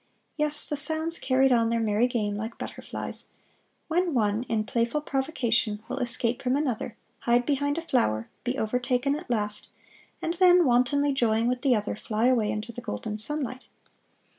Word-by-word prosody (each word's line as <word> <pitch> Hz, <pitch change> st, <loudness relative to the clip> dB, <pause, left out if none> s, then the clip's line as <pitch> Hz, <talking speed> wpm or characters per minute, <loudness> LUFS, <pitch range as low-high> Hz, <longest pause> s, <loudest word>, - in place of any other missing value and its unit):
Yes, 300 Hz, -1 st, +2 dB
the 295 Hz, -, -2 dB
sounds 315 Hz, +3 st, +1 dB
carried 265 Hz, 0 st, +3 dB
on 230 Hz, -2 st, +3 dB
their 230 Hz, 0 st, +1 dB
merry 220 Hz, +2 st, +2 dB
game 215 Hz, -4 st, -1 dB
like 220 Hz, +3 st, -5 dB
butterflies, -, -, -6 dB, 0.6 s
when 340 Hz, -1 st, +1 dB
one, 210 Hz, -1 st, +2 dB
in 220 Hz, -1 st, +1 dB
playful 235 Hz, +6 st, 0 dB
provocation, 240 Hz, -7 st, 0 dB
will -, -, -4 dB
escape 240 Hz, -1 st, 0 dB
from 255 Hz, 0 st, +1 dB
another, 255 Hz, -6 st, -2 dB, 0.2 s
hide 240 Hz, +1 st, +2 dB
behind 285 Hz, +1 st, 0 dB
a 335 Hz, -, -3 dB
flower, 115 Hz, -, +1 dB, 0.2 s
be 255 Hz, +1 st, -2 dB
overtaken 250 Hz, +4 st, 0 dB
at 305 Hz, -1 st, -8 dB
last, 210 Hz, -3 st, -1 dB, 0.5 s
and 330 Hz, -, -2 dB
then, 355 Hz, -1 st, +6 dB
wantonly 270 Hz, +3 st, +3 dB
joying 230 Hz, -3 st, +2 dB
with 250 Hz, 0 st, 0 dB
the 265 Hz, -4 st, +4 dB
other, 210 Hz, -1 st, -2 dB
fly 215 Hz, +2 st, -1 dB
away 240 Hz, -4 st, +3 dB
into 210 Hz, +3 st, -3 dB
the 245 Hz, -, -8 dB
golden 215 Hz, -2 st, -4 dB
sunlight. 260 Hz, +1 st, -3 dB
245 Hz, 165 wpm, -27 LUFS, 225-285 Hz, 0.6 s, then